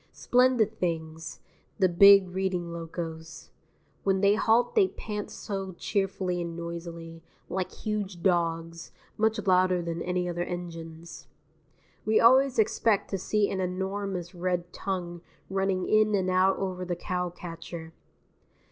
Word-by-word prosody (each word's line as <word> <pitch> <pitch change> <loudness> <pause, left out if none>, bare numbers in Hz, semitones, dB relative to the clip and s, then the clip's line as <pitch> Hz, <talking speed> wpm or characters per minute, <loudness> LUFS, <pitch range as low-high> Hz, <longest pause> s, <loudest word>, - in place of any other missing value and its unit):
Splendid 245 -3 +2
things, 160 -3 -3 0.4
the 190 - +4
big 195 +2 +7
Reading 180 -2 -2
locos; 165 -1 -7 0.5
when 190 -1 +2
they 200 0 +5
halt 225 - +2
they 420 -5 +5
pant 210 - -6
so 195 -2 -5
cheerfully 185 -1 -1
and 170 -1 -5
noisily, 170 -1 -7 0.3
like 185 -1 -2
huge 205 -5 -4
dogs, 165 -2 0 0.2
much 220 +1 +1
louder 185 -1 +4
than 170 -1 -4
any 180 0 -1
other 175 0 -3
engines. 165 -2 -7 0.8
We 215 0 +3
always 260 +3 +5
expect 220 -1 +2
to 195 - -1
see 210 +2 +1
an 190 - -2
enormous 190 0 -3
red 175 -1 -2
tongue 175 -3 -4 0.3
running 190 -1 0
in 215 -1 +4
and 185 -1 0
out 185 +1 +3
over 185 -1 -3
the 180 -1 -2
cowcatcher. 175 -2 -5
185 Hz, 130 wpm, -28 LUFS, 170-200 Hz, 0.8 s, big